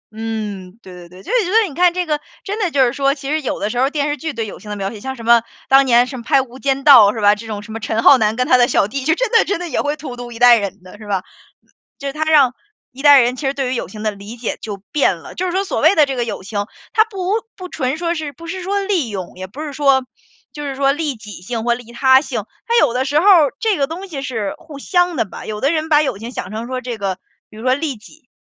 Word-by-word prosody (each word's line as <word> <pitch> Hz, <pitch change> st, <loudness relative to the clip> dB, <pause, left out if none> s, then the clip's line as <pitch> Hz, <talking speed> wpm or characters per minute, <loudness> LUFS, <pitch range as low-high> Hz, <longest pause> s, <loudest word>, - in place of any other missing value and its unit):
嗯， 210 Hz, -4 st, -5 dB
对 185 Hz, -, -12 dB
对 175 Hz, -1 st, -12 dB
对， 180 Hz, +2 st, -14 dB
就 -, -, -7 dB
是 -, -, +3 dB
觉 360 Hz, -, -4 dB
得 445 Hz, 0 st, +4 dB
你 310 Hz, -, -10 dB
看 355 Hz, +4 st, +4 dB
这 360 Hz, +1 st, -2 dB
个， 300 Hz, -2 st, -1 dB, 0.2 s
真 415 Hz, +2 st, -4 dB
的 390 Hz, -5 st, +1 dB
就 280 Hz, -4 st, +3 dB
是 240 Hz, -, -1 dB
说， 275 Hz, 0 st, +1 dB
其 280 Hz, -1 st, -6 dB
实 310 Hz, +1 st, 0 dB
有 265 Hz, -, -3 dB
的 210 Hz, -, -2 dB
时 245 Hz, -, -3 dB
候 265 Hz, +2 st, +3 dB
电 290 Hz, -1 st, -1 dB
视 290 Hz, -, -1 dB
剧 315 Hz, +1 st, -5 dB
对 230 Hz, -5 st, -4 dB
友 205 Hz, -, -9 dB
情 210 Hz, -, -12 dB
的 210 Hz, -, -4 dB
描 195 Hz, 0 st, -3 dB
写， 215 Hz, -, -9 dB
像 265 Hz, +4 st, -5 dB
什 235 Hz, -, -10 dB
么 235 Hz, 0 st, +6 dB, 0.3 s
当 270 Hz, +1 st, +6 dB
年 240 Hz, 0 st, +5 dB
什 260 Hz, +1 st, -7 dB
么 235 Hz, -, -8 dB
拍 270 Hz, -, +3 dB
《无 255 Hz, +1 st, -14 dB
间 275 Hz, 0 st, -1 dB
道》 255 Hz, -8 st, +8 dB
是 -, -, -4 dB
吧， 205 Hz, -1 st, +5 dB
这 215 Hz, +2 st, -8 dB
种 210 Hz, -2 st, -5 dB
什 220 Hz, -, -11 dB
么 225 Hz, -, -5 dB
陈 220 Hz, 0 st, -2 dB
浩 275 Hz, -2 st, +7 dB
南 215 Hz, -1 st, +1 dB
跟 250 Hz, +1 st, 0 dB
他 -, -, +5 dB
的 245 Hz, -1 st, +4 dB
小 200 Hz, -, +2 dB
弟， 275 Hz, +5 st, -4 dB
就 320 Hz, +2 st, +3 dB
真 -, -, -1 dB
的 455 Hz, -, +5 dB
真 400 Hz, -3 st, -2 dB
的 355 Hz, -, -5 dB
也 -, -, 0 dB
会 290 Hz, +1 st, -1 dB
荼 275 Hz, -4 st, -7 dB
毒 245 Hz, 0 st, -8 dB
一 230 Hz, -, -9 dB
代 245 Hz, 0 st, +7 dB
人 200 Hz, -2 st, -6 dB
的， 185 Hz, +3 st, -14 dB
是 215 Hz, -, -11 dB
吧， 195 Hz, -2 st, -1 dB, 0.8 s
就 280 Hz, -, -5 dB
是 275 Hz, -, -4 dB
它 305 Hz, +1 st, -1 dB
让 290 Hz, -5 st, +4 dB, 0.4 s
一 270 Hz, +2 st, -11 dB
代 285 Hz, -2 st, +8 dB
人 245 Hz, +1 st, +1 dB
其 280 Hz, -, -6 dB
实 270 Hz, -, +1 dB
对 270 Hz, -2 st, -2 dB
于 -, -, -1 dB
友 -, -, -3 dB
情 215 Hz, -, -10 dB
的 215 Hz, -, 0 dB
理 205 Hz, +3 st, -9 dB
解 230 Hz, -, -4 dB
就 205 Hz, -2 st, -6 dB
变 275 Hz, -, +2 dB
了。 -, -, -12 dB
就 370 Hz, -, -2 dB
是 360 Hz, -, -1 dB
说 380 Hz, +2 st, 0 dB
所 395 Hz, -, -3 dB
谓 320 Hz, +5 st, +5 dB
的 305 Hz, -6 st, +4 dB
这 270 Hz, -, -3 dB
个 245 Hz, -, -1 dB
友 230 Hz, -, -5 dB
情， 205 Hz, +1 st, -3 dB, 0.3 s
他 435 Hz, -, +5 dB
不 405 Hz, 0 st, -2 dB
不 365 Hz, -1 st, -9 dB
纯 260 Hz, -2 st, -2 dB
说 340 Hz, 0 st, -1 dB
是 310 Hz, -3 st, -5 dB
不 335 Hz, +5 st, -12 dB
是 370 Hz, +2 st, -5 dB
说 400 Hz, +2 st, -1 dB
利 385 Hz, -, -1 dB
用， 190 Hz, -4 st, -6 dB
也 185 Hz, +1 st, -7 dB
不 235 Hz, +11 st, -10 dB
是 305 Hz, -, -5 dB
说， 275 Hz, -2 st, +2 dB, 0.5 s
就 295 Hz, -, -8 dB
是 275 Hz, -2 st, -4 dB
说 275 Hz, 0 st, +2 dB
利 295 Hz, -1 st, -2 dB
己 215 Hz, -2 st, -13 dB
性 225 Hz, +3 st, -4 dB
或 235 Hz, 0 st, +2 dB
利 240 Hz, -1 st, -12 dB
他 260 Hz, +2 st, +5 dB
性。 -, -, -4 dB, 0.2 s
它 470 Hz, -, 0 dB
有 -, -, +2 dB
的 260 Hz, +1 st, 0 dB
时 290 Hz, +2 st, +2 dB
候 345 Hz, -, 0 dB
儿 330 Hz, -9 st, +6 dB
这 435 Hz, -4 st, +1 dB
个 275 Hz, -, +1 dB
东 340 Hz, +7 st, -7 dB
西 285 Hz, -7 st, -6 dB
是 225 Hz, -8 st, -3 dB
互 315 Hz, -4 st, -12 dB
相 355 Hz, +3 st, +1 dB
的 245 Hz, -, 0 dB
吧， 190 Hz, -, -10 dB
有 210 Hz, -1 st, -5 dB
的 275 Hz, -, +2 dB
人 315 Hz, -1 st, -2 dB
把 300 Hz, -1 st, +5 dB
友 270 Hz, -8 st, -2 dB
情 230 Hz, +4 st, -8 dB
想 -, -, -6 dB
成 220 Hz, +2 st, -5 dB
说 255 Hz, +1 st, -4 dB
这 245 Hz, -2 st, -5 dB
个， 195 Hz, -2 st, -3 dB, 0.3 s
比 215 Hz, -, -13 dB
如 220 Hz, -, -9 dB
说 255 Hz, 0 st, +3 dB
利 285 Hz, -1 st, -3 dB
己， 245 Hz, +6 st, -18 dB
265 Hz, 330 characters per minute, -18 LUFS, 225-310 Hz, 0.8 s, 道